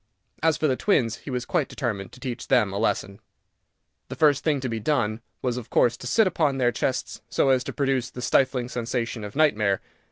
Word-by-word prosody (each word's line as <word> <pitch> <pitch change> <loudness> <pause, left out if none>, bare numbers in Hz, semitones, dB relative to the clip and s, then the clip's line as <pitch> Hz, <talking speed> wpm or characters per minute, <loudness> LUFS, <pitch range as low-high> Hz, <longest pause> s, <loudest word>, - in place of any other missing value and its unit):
As 160 -1 +3
for - - -1
the 130 - +2
twins, 125 - +1
he - - -10
was 125 -1 -2
quite 160 -6 0
determined 105 -8 -3
to 125 - -13
teach 125 -2 -5
them 115 -7 +3
a 100 - -2
lesson. 100 -2 -1 0.9
The - - -6
first 145 -3 +3
thing 150 -3 +1
to 130 - -2
be 115 -2 -3
done 115 -3 0 0.2
was, 125 -1 0
of 120 -2 -7
course, 120 -1 +3
to 125 - -7
sit 220 - +4
upon 155 -7 +1
their 125 -2 +3
chests, 130 +3 -2
so 135 - +2
as 130 -1 +3
to - - -4
produce 135 -3 0
the 125 - -8
stifling 130 -2 +2
sensation 120 -2 -3
of 105 +3 -7
nightmare. 105 -11 +3
125 Hz, 215 wpm, -25 LUFS, 115-140 Hz, 0.9 s, sit